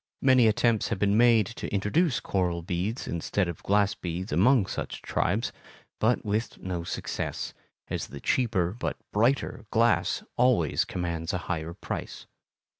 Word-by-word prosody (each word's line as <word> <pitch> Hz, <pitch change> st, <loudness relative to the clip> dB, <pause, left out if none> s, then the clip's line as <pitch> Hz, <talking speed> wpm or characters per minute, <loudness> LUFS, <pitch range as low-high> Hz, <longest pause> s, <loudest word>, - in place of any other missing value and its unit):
Many 130 Hz, -3 st, +6 dB
attempts 110 Hz, 0 st, +2 dB
have -, -, -1 dB
been 100 Hz, +1 st, +2 dB
made 115 Hz, -2 st, +5 dB
to 115 Hz, -, -6 dB
introduce 120 Hz, -, +1 dB
coral 90 Hz, -3 st, -1 dB
beads 90 Hz, +7 st, -2 dB
instead 85 Hz, +3 st, -1 dB
of 85 Hz, -, -6 dB
glass 100 Hz, 0 st, +2 dB
beads 90 Hz, +3 st, -5 dB
among 125 Hz, -6 st, +4 dB
such -, -, -5 dB
tribes, 105 Hz, +6 st, 0 dB, 0.5 s
but 115 Hz, +2 st, +2 dB
with 105 Hz, +2 st, -1 dB
no 90 Hz, -2 st, -4 dB
success, -, -, -4 dB, 0.3 s
as -, -, -3 dB
the 70 Hz, -, -9 dB
cheaper, 100 Hz, -, +1 dB
but 120 Hz, -, -3 dB, 0.2 s
brighter, 115 Hz, 0 st, +1 dB
glass 115 Hz, +1 st, +2 dB
always 120 Hz, -, +3 dB
commands 85 Hz, -1 st, -3 dB
a -, -, +1 dB
higher 85 Hz, -1 st, -3 dB
price. -, -, -6 dB
105 Hz, 145 wpm, -27 LUFS, 90-115 Hz, 0.5 s, Many